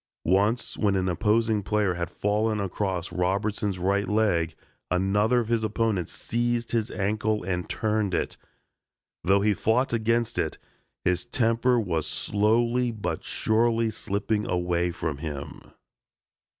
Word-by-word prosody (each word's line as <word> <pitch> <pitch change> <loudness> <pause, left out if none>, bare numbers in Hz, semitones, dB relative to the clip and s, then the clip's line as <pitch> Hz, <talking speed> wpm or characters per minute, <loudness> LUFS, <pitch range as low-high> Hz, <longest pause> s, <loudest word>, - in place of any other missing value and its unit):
Once 105 +6 +1
when 100 -2 +2
an 95 -1 +1
opposing 105 +4 +2
player 105 -1 +1
had 85 -1 -3
fallen 105 +1 0
across 95 -2 -2
Robertson's 100 +2 0
right 100 +3 +1
leg, 100 -7 +1 0.3
another 105 +6 +2
of 115 - -5
his 115 -1 +1
opponents 110 -5 0
seized 120 0 -1
his 115 -1 0
ankle 105 +2 -1
and 90 -1 -3
turned 105 -4 0
it. - - -1 0.9
Though 100 +2 +4
he 105 0 +3
fought 120 +6 +1
against 115 0 +1
it, - - -1 0.5
his 90 +2 +1
temper 120 0 +2
was 85 -8 -1
slowly 115 +4 +1
but 110 -3 -4
surely 115 0 +1
slipping 105 0 -2
away 90 0 +1
from 80 -5 -3
him. 75 -3 -7
105 Hz, 130 wpm, -26 LUFS, 95-115 Hz, 0.9 s, Though